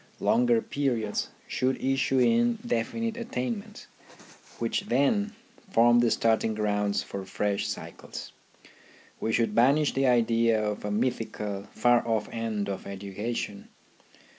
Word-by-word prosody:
Longer 235 Hz, 0 st, +3 dB
periods 120 Hz, -7 st, -1 dB, 0.2 s
should 130 Hz, +1 st, -1 dB
issue 135 Hz, 0 st, +1 dB
in 235 Hz, -, +3 dB
definite 230 Hz, -, -1 dB
attainments, 125 Hz, -, -4 dB, 0.7 s
which 115 Hz, -1 st, -1 dB
then 205 Hz, -, +2 dB, 0.4 s
form 120 Hz, -6 st, +5 dB
the 120 Hz, -1 st, +4 dB
starting 110 Hz, 0 st, +2 dB
grounds 105 Hz, -1 st, 0 dB
for 100 Hz, -1 st, -6 dB
fresh 100 Hz, +2 st, -1 dB
cycles. 100 Hz, -, -7 dB, 0.9 s
We 110 Hz, -, -1 dB
should 115 Hz, -2 st, +1 dB
banish 140 Hz, +6 st, +4 dB
the 135 Hz, 0 st, +2 dB
idea 115 Hz, -2 st, +3 dB
of 105 Hz, -1 st, -2 dB
a 105 Hz, -, -2 dB
mythical, 105 Hz, -3 st, -2 dB
far 120 Hz, -1 st, +4 dB
off 110 Hz, -2 st, 0 dB
end 110 Hz, -3 st, -2 dB
of 100 Hz, -1 st, -5 dB
education. 100 Hz, +2 st, -5 dB
115 Hz, 120 wpm, -28 LUFS, 105-135 Hz, 0.9 s, form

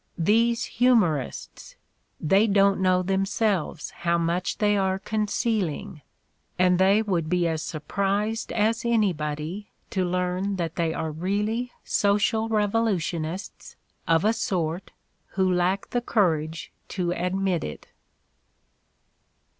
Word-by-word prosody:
These 230 Hz, +7 st, +2 dB
humorists! 215 Hz, -, 0 dB, 0.4 s
They 195 Hz, +8 st, +3 dB
don't 200 Hz, -1 st, +3 dB
know 185 Hz, -1 st, +3 dB
themselves 195 Hz, -1 st, -1 dB
how 170 Hz, 0 st, 0 dB
much 170 Hz, +2 st, -1 dB
they 205 Hz, -1 st, +2 dB
are 190 Hz, -1 st, +1 dB
concealing; 205 Hz, -4 st, -2 dB, 0.6 s
and 180 Hz, 0 st, +3 dB
they 195 Hz, +3 st, +4 dB
would 175 Hz, -7 st, -1 dB
be 175 Hz, -1 st, +2 dB
as 160 Hz, -1 st, -1 dB
surprised 200 Hz, +8 st, -2 dB
as 225 Hz, +1 st, +1 dB
anybody 180 Hz, -4 st, -1 dB, 0.2 s
to 190 Hz, -, 0 dB
learn 180 Hz, +2 st, -1 dB
that 170 Hz, -3 st, -3 dB
they 165 Hz, -1 st, 0 dB
are 160 Hz, 0 st, -3 dB
really 210 Hz, +9 st, -2 dB
social 210 Hz, +2 st, +1 dB
revolution 205 Hz, -6 st, 0 dB
ists 180 Hz, +6 st, -8 dB, 0.3 s
of 165 Hz, +2 st, +3 dB
a 220 Hz, -, +4 dB
sort 180 Hz, -5 st, -2 dB, 0.5 s
who 190 Hz, -1 st, +3 dB
lack 180 Hz, +2 st, 0 dB
the 245 Hz, -, 0 dB
courage 165 Hz, -9 st, 0 dB, 0.2 s
to 180 Hz, -3 st, -2 dB
admit 180 Hz, 0 st, -1 dB
it. 75 Hz, -, -8 dB
190 Hz, 115 wpm, -25 LUFS, 170-210 Hz, 0.6 s, they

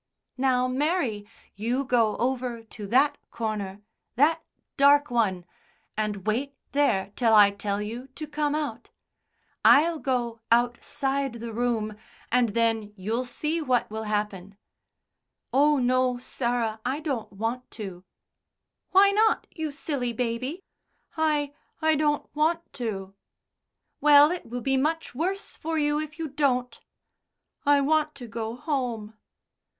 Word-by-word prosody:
"Now, 255 Hz, -1 st, +2 dB
Mary, 255 Hz, -, -1 dB, 0.3 s
you 240 Hz, +6 st, -1 dB
go 230 Hz, -4 st, +2 dB
over 245 Hz, -2 st, -2 dB
to 215 Hz, -2 st, -9 dB
that 270 Hz, +7 st, +3 dB
corner 210 Hz, -3 st, -4 dB, 0.3 s
that 320 Hz, +5 st, +3 dB, 0.3 s
dark 285 Hz, 0 st, +5 dB
one 195 Hz, -7 st, +1 dB, 0.5 s
and 210 Hz, -3 st, -2 dB
wait 265 Hz, +6 st, -1 dB, 0.2 s
there 200 Hz, -9 st, +1 dB
till 230 Hz, -3 st, +4 dB
I 205 Hz, -1 st, +8 dB
tell 200 Hz, 0 st, -2 dB
you 235 Hz, +5 st, -6 dB
to 310 Hz, -, -5 dB
come 300 Hz, 0 st, -1 dB
out. 280 Hz, -7 st, -4 dB, 0.7 s
I'll 320 Hz, +2 st, +6 dB
go 240 Hz, -4 st, -2 dB
outside 245 Hz, +3 st, +1 dB
the 235 Hz, -1 st, -7 dB
room, 225 Hz, -2 st, -1 dB, 0.4 s
and 245 Hz, -1 st, +3 dB
then 225 Hz, -2 st, 0 dB
you'll 225 Hz, +7 st, -2 dB
see 310 Hz, +6 st, -2 dB
what 250 Hz, -7 st, +1 dB
will 220 Hz, 0 st, -4 dB
happen." 205 Hz, -2 st, -3 dB, 1.0 s
"Oh, 290 Hz, +2 st, +4 dB
no, 255 Hz, 0 st, +2 dB
Sarah, 235 Hz, -3 st, -2 dB
I 265 Hz, +4 st, -1 dB
don't 275 Hz, -8 st, -3 dB
want 225 Hz, +5 st, -3 dB
to." 190 Hz, -5 st, -7 dB, 0.9 s
"Why 395 Hz, +1 st, +6 dB
not, 435 Hz, +2 st, +3 dB
you 315 Hz, -2 st, -4 dB
silly 275 Hz, -4 st, -3 dB
baby?" 255 Hz, -, -3 dB, 0.5 s
"I 300 Hz, -3 st, +1 dB, 0.3 s
I 315 Hz, -1 st, +3 dB
don't 295 Hz, -1 st, +1 dB
want 325 Hz, +3 st, 0 dB
to." 195 Hz, -6 st, -4 dB, 0.9 s
"Well, 295 Hz, +1 st, +7 dB
it 360 Hz, -, -4 dB
will 245 Hz, +1 st, -5 dB
be 270 Hz, +2 st, +1 dB
much 320 Hz, +4 st, -1 dB
worse 370 Hz, -, -2 dB
for 325 Hz, +1 st, -3 dB
you 295 Hz, 0 st, +1 dB
if 305 Hz, 0 st, -6 dB
you 325 Hz, -1 st, -3 dB
don't." 255 Hz, -4 st, 0 dB, 0.9 s
"I 285 Hz, -1 st, +5 dB
want 305 Hz, +1 st, +1 dB
to 260 Hz, -3 st, -9 dB
go 225 Hz, 0 st, -4 dB
home." 245 Hz, -6 st, -3 dB
250 Hz, 135 wpm, -26 LUFS, 225-295 Hz, 1.0 s, I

